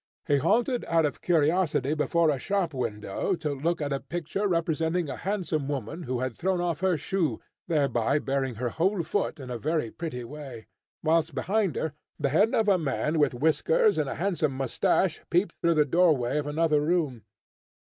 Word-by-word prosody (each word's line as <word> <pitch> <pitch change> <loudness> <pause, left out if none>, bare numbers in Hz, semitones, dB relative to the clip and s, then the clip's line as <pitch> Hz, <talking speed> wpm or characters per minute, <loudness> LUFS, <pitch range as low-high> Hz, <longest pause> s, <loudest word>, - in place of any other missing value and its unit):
He 145 - +3
halted 240 - +1
out 165 -1 +2
of 145 - -3
curiosity 155 -3 +2
before 160 +1 +2
a 140 - -2
shop 195 -3 -1
window, 115 - -2
to 155 -3 -3
look 165 +5 -1
at 145 -1 -1
a 135 - -1
picture 175 +8 -3
representing 165 -1 0
a - - -4
handsome 175 -7 -2
woman, 140 +3 -4
who 125 -1 -1
had 130 -2 -2
thrown 185 0 0
off 175 -2 -1
her 185 -2 +2
shoe, 165 +2 -1 0.3
thereby 140 -4 +1
baring 135 -3 -1
her 120 +2 -2
whole 175 - 0
foot 165 -1 -2
in 130 -2 -7
a 120 - -4
very 155 -4 -1
pretty 155 -8 -5
way; 130 -3 -9 0.4
whilst 160 -1 +2
behind 195 +7 0
her 160 -3 -2 0.3
the 145 -2 +1
head 200 - +3
of 220 - +2
a 195 -3 +4
man 155 +1 -1
with 145 -4 +2
whiskers 420 - +2
and - - 0
a - - -4
handsome 165 -7 0
moustache 135 +6 +1
peeped 175 0 +2
through 170 -1 +3
the 150 -1 +4
doorway 150 -4 +2
of 145 - -4
another 155 0 +2
room. 150 -7 0
155 Hz, 185 wpm, -27 LUFS, 140-175 Hz, 0.4 s, a